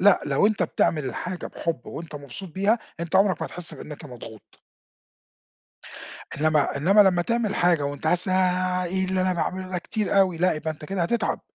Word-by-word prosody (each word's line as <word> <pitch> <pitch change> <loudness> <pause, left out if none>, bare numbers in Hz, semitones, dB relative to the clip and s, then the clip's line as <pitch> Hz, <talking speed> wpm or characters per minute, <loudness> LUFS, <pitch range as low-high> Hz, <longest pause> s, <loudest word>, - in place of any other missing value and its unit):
لأ 195 0 +6
لو 145 +8 +3
أنت 215 -1 +1
بتعمل 155 -3 +1
الحاجة 180 +7 -4
بحب 165 -1 -4
وأنت 165 -2 -8
مبسوط 145 +7 -8
بيها، 205 +6 +2 0.2
أنت 170 +2 0
عمرَك 195 -1 +3
ما - - -1
هتحس 170 -2 -5
بإنَّك 150 +2 -9
مضغوط. 115 -5 -12 1.8
إنّما 155 -2 +2
إنّما 195 +8 +5
لمّا 185 -3 +4
تعمل 230 0 0
حاجة، 175 -4 +3
وأنت 145 +2 -3
حاسس 175 +3 +2
إنّها 185 0 +1
إيه 190 +2 -1
اللي 185 0 0
أنا 185 0 +2
باعمله 185 +2 -2
ده 180 - -2
كتير 200 +2 0
أوي! 185 -4 +3
لأ 180 +1 +3
يبقى 155 +1 -3
أنت 155 0 -10
كده 195 +2 -2
هتتعب، 230 +8 0
180 Hz, 180 wpm, -25 LUFS, 155-190 Hz, 1.8 s, لأ